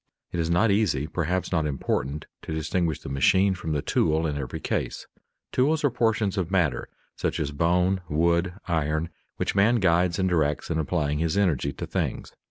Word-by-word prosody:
_ - - -62 0.3
It 85 - -3
is 80 -1 0
not 100 +6 +3
easy, 95 -9 +1
perhaps 85 +2 -2
not 80 -4 +1
important, 70 +1 -2 0.2
to - - -8
distinguish 80 0 -1
the - - -9
machine 95 +9 +3
from 80 -3 -5
the 75 - -1
tool 80 +1 +1
in 75 -2 -1
every 70 -3 -4
case. - - -3 0.5
Tools 150 +5 +2
are 145 - +3
portions 110 -4 +1
of 85 -3 -2
matter, 85 -10 0 0.3
such - - -2
as 75 -2 -1
bone, 90 +5 +2
wood, 85 +3 +1
iron, 80 -1 0 0.3
which - - -1
man 105 +5 +4
guides 90 -4 +2
and 95 - +1
directs 80 -5 0
in 80 - 0
applying 75 -2 0
his 80 +3 0
energy 80 -8 +1
to - - -5
things. - - -3
85 Hz, 185 wpm, -26 LUFS, 75-95 Hz, 0.5 s, man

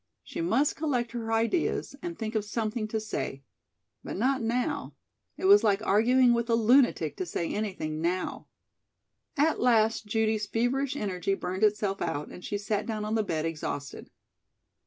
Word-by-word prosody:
She - - -5
must 230 - +2
collect 255 -7 -1
her 230 -2 -4
ideas, 230 +6 0
and 345 -1 -5
think 220 -1 -4
of 215 -2 0
something 215 +1 -2
to 220 +1 -2
say. 175 -10 -4 0.6
But - - -5
not 260 +4 +1
now. 235 +2 -1 0.4
It - - -4
was 405 +2 +7
like 205 +1 +2
arguing 240 +4 +4
with 235 0 -1
a 230 - +4
lunatic 240 +4 +3
to 370 - -2
say 170 - -2
anything 185 -7 -3
now. 180 +2 -2 0.9
At 310 +3 +2
last 225 -2 +3
Judy's 220 0 0
feverish 260 +5 0
energy 195 -5 -1
burned 185 0 -4
itself 210 -2 +1
out 145 +1 -2
and 180 - -11
she 205 - -2
sat 205 0 -2
down 215 -2 -3
on 215 - -2
the 225 - +2
bed 160 -6 -2
exhausted. 150 -3 -5
220 Hz, 165 wpm, -28 LUFS, 200-245 Hz, 0.9 s, was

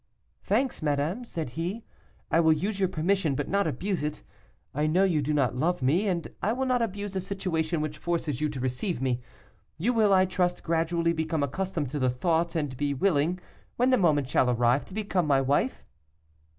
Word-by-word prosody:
"'Thanks, 250 +5 0
madame,' 150 - 0
said 165 - -5
he, 175 - -4 0.5
'I 165 - +4
will 160 -1 +5
use 195 +6 -2
your 190 -2 +2
permission, 175 -3 +1
but 145 - -2
not 200 -2 +1
abuse 185 +6 -2
it. 150 0 -4 0.5
I 150 +2 0
know 180 +5 +3
you 170 -6 +2
do 145 +2 -1
not 135 -5 +1
love 165 +3 0
me, 170 +11 +2
and 175 -3 -1
I 215 +4 +1
will 265 +2 -1
not 250 -2 +1
abuse 205 -2 -3
a 190 - 0
situation 175 -4 -2
which 150 0 -4
forces 165 -5 -2
you 155 - +1
to 140 -3 -6
receive 130 - -2
me. 125 -2 -1 0.6
You 230 +9 +1
will, 215 -3 +3
I 190 -1 +5
trust, 180 -1 -1
gradually 170 0 +1
become 160 -2 -1
accustomed 165 0 -2
to 145 +2 -3
the 130 -1 +2
thought, 165 +6 0
and 145 -5 -1
be 145 +1 -1
willing, 165 +1 +2 0.4
when 250 +2 +2
the 255 - +5
moment 150 -7 +3
shall 130 -1 +2
arrive, 120 +2 +2
to 185 - -12
become 195 -6 0
my 140 -2 +4
wife. 140 - 0
165 Hz, 200 wpm, -27 LUFS, 145-190 Hz, 0.6 s, will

